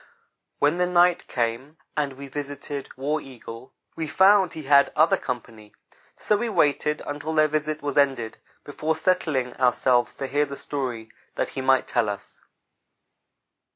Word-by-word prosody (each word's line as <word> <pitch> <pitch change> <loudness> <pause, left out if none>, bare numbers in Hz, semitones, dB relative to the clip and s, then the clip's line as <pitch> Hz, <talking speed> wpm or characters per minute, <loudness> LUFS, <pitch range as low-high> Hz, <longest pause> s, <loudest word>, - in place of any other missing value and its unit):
When 145 +4 +2
the 180 - +2
night 180 0 +3
came 120 +6 -2 0.2
and 145 -2 -1
we 140 +1 -9
visited 145 0 -6
War 150 +3 -1
Eagle, 125 -2 -11 0.2
we 160 -1 -3
found 190 +1 +4
he 155 - -7
had 140 0 +5
other 155 +2 +5
company 110 -4 -7 0.4
so 210 - +1
we 235 +2 -2
waited 150 -5 +1
until 150 +2 -4
their 155 0 +5
visit 155 0 -2
was 145 0 +1
ended 135 -6 0 0.2
before 155 +2 -2
settling 155 -8 0
ourselves 125 -1 +2
to 135 - -4
hear 145 +2 0
the 140 0 -7
story 120 -6 -4 0.2
that - - -1
he 135 - -5
might 130 0 +3
tell 115 -3 0
us. 100 - -8
145 Hz, 155 wpm, -25 LUFS, 130-155 Hz, 0.4 s, had